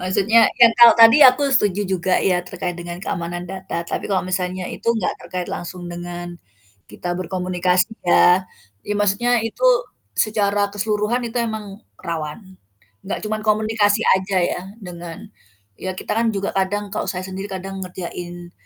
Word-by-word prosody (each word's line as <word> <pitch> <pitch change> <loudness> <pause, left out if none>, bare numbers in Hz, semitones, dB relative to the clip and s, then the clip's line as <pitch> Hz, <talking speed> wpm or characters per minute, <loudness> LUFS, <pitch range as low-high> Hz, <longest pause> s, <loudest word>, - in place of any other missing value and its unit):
Maksudnya 195 +5 +2 0.2
kan 235 - +9
kalau 235 -1 +9
tadi 230 +3 +9
aku 255 +3 +1
setuju 205 -4 +2
juga 185 0 -1 0.2
ya 180 - +3
terkait 180 -1 -4
dengan 175 0 -7
keamanan 175 -1 -4
data 190 -1 -7 0.2
tapi - - -3
kalau 190 - +2
misalnya 180 0 -2
itu - - -5
nggak 200 - -1
terkait 180 -1 -5
langsung 175 +1 -7
dengan 175 0 -6 0.6
kita 105 +12 -7
berkomunikasi 180 0 0 0.2
ya, 180 +1 +5 0.4
ya 210 - 0
maksudnya 205 +4 +1
itu 225 - -5 0.6
secara 205 -1 0
keseluruhan 210 +3 -1
itu 230 - -9
emang 220 -2 -3 0.4
rawan 155 -3 -4 0.7
nggak 195 - -4
cuman 215 0 -2
komunikasi 215 0 +2
aja 190 +1 -1 0.2
ya - - -4 0.3
dengan 170 -1 -8 0.6
ya 185 0 -3
kita - - -4
kan 230 - +1
juga 195 0 -2
kadang 205 +2 0
kalau - - -2
saya 180 0 -3
sendiri 190 +1 -6
kadang 195 +1 -6
ngerjain 175 -1 -7
190 Hz, 150 wpm, -21 LUFS, 180-210 Hz, 0.7 s, kan